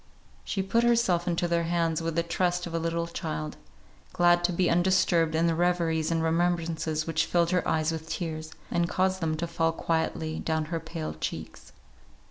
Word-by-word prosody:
She 195 - -2
put 230 +5 +2
herself 230 -8 +2
into 175 0 +1
their 170 -1 +1
hands 165 -1 0
with 165 -1 -2
the 170 - +2
trust 175 +1 0
of 170 - -7
a 165 - 0
little 165 0 -1
child; 80 - -4 0.6
glad 175 0 +4
to 180 - +1
be 180 +1 +1
undisturbed 175 -2 +3
in 165 +1 +2
the 165 - +3
reveries 165 -2 +1
and 165 -1 0
remembrances 165 -2 0
which 160 0 0
filled 170 0 +2
her 180 -1 +1
eyes 155 0 +1
with 160 0 -6
tears, 155 -3 -4 0.2
and 170 0 +1
caused 190 0 +1
them 160 -1 0
to 170 - -2
fall 165 -1 0
quietly 160 -1 -2
down 160 -1 -1
her 165 - 0
pale 160 - -5
cheeks. 80 - -6
170 Hz, 185 wpm, -28 LUFS, 160-175 Hz, 0.6 s, glad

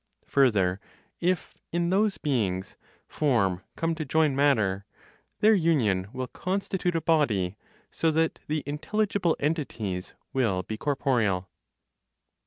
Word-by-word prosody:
Further, 100 -9 +3 0.4
if 180 0 0 0.2
(in 170 +1 0
those 205 +1 +2
beings) 100 -10 -1 0.3
form 110 -11 +1
come 165 0 0
to 160 -1 -3
join 150 -1 +2
matter, 110 -9 +2 0.6
their 215 +1 +6
union 130 - +2
will 130 +1 -3
constitute 185 +2 -2
a 165 - +1
body, 115 - +2 0.4
so 165 - +1
that 160 +1 +1
the 155 0 -1
intelligible 185 +4 0
(entities) 115 - -2 0.2
will 110 -9 +1
be 110 - -5
corporeal. 115 -9 0
140 Hz, 115 wpm, -27 LUFS, 100-165 Hz, 0.6 s, their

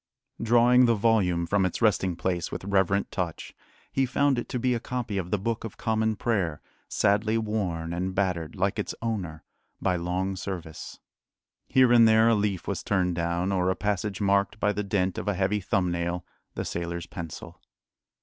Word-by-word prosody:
Drawing 120 +2 +5
the 115 - +4
volume 100 -6 +2
from 100 +3 +1
its 95 - -1
resting 95 -5 +2
place 90 -1 -2
with - - -5
reverent 100 0 +1
touch, 90 -3 -4 0.4
he 135 -1 +1
found 140 0 +2
it - - -6
to - - -2
be 125 +1 +1
a 120 - -1
copy 120 -5 -3
of 90 -2 -5
the 105 - +1
Book 115 +4 -2
of 115 - -7
Common 110 -1 0
Prayer, 95 -9 -1 0.3
sadly 105 +2 +2
worn 95 -7 -2
and 95 +2 -3
battered, 90 -4 -1
like 100 +2 0
its 105 - -3
owner, 90 -9 -3 0.4
by 90 -2 +1
long 90 +3 -2
service. 90 -4 -7 0.7
Here 130 -2 +5
and 115 -1 +7
there 110 +1 +5
a - - +5
leaf 100 -3 -1
was - - -2
turned 90 -3 +1
down, 85 +2 -1
or 90 -1 +1
a 95 - +1
passage 105 -1 -2
marked 100 +1 +1
by 105 0 +2
the 105 +1 -2
dent 95 -2 0
of - - -6
a 105 - +1
heavy 100 +3 +1
thumb 90 -1 0
nail 85 0 -2 0.3
the - - -3
sailor's 85 0 -4
pencil. 85 -3 -8
100 Hz, 185 wpm, -27 LUFS, 90-110 Hz, 0.7 s, and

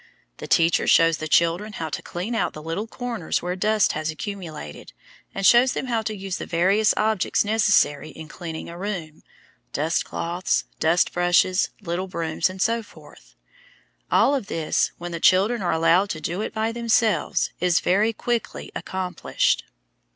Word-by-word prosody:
The - - -8
teacher 165 0 +3
shows 165 -1 +5
the 155 - -5
children 170 +7 +2
how 160 -4 -4
to - - -4
clean 185 +7 -5
out 225 - 0
the 155 - -9
little 165 +7 -3
corners 230 -9 -3
where 180 +1 -2
dust 215 +2 +2
has 155 +1 -3
accumulated, 160 - -7 0.4
and 195 - -2
shows 245 +4 +6
them - - -3
how 235 -3 0
to 215 0 -4
use 195 -2 -4
the - - -6
various 195 +5 +3
objects 215 -2 +1
necessary 210 -9 +2
in 160 -1 -10
cleaning 165 0 -7
a 170 +1 -9
room,–dust 165 -4 -4
cloths, 175 +2 -1 0.2
dust 165 +3 +2
brushes, 175 +1 +2
little 180 0 -3
brooms, 165 -2 -1
etc. 220 +4 -3 1.0
All 280 - +4
of 265 -8 -2
this, 160 -3 0
when 175 0 -6
the 170 - -4
children 200 +7 +3
are 175 - 0
allowed 165 +5 +3
to 155 - -4
do 170 +6 -3
it - - -3
by 220 +1 -1
themselves, 230 -6 +1
is 180 -1 +3
very 205 +5 +2
quickly 235 +1 -3
accomplished. 185 -1 -1
185 Hz, 160 wpm, -23 LUFS, 165-215 Hz, 1.0 s, shows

